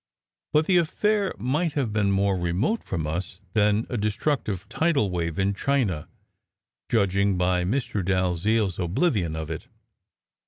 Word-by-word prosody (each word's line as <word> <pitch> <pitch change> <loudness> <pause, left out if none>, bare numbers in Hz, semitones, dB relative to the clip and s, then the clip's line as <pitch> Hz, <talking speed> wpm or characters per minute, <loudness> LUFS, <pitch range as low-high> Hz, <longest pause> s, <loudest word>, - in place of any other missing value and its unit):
But 150 +1 +3
the 185 +1 +4
affair 200 +4 +1
might 145 - 0
have 125 -7 -1
been 105 -2 +2
more 100 0 +2
remote 90 - 0
from 80 -4 -3
us 85 +4 -4
all 100 - -32
than 105 +1 +3
a 120 - -3
destructive 105 - -1
tidal 140 - +1
wave 85 -2 -2
in 95 +1 +1
China, 105 - 0 0.8
judging 100 -3 +2
by 90 0 +2
Mr. 105 -2 -1
Dalziel 95 +3 +1
s 90 - -9
oblivion 90 - 0
of 80 0 -5
it. 80 - -6
100 Hz, 150 wpm, -25 LUFS, 90-130 Hz, 0.8 s, the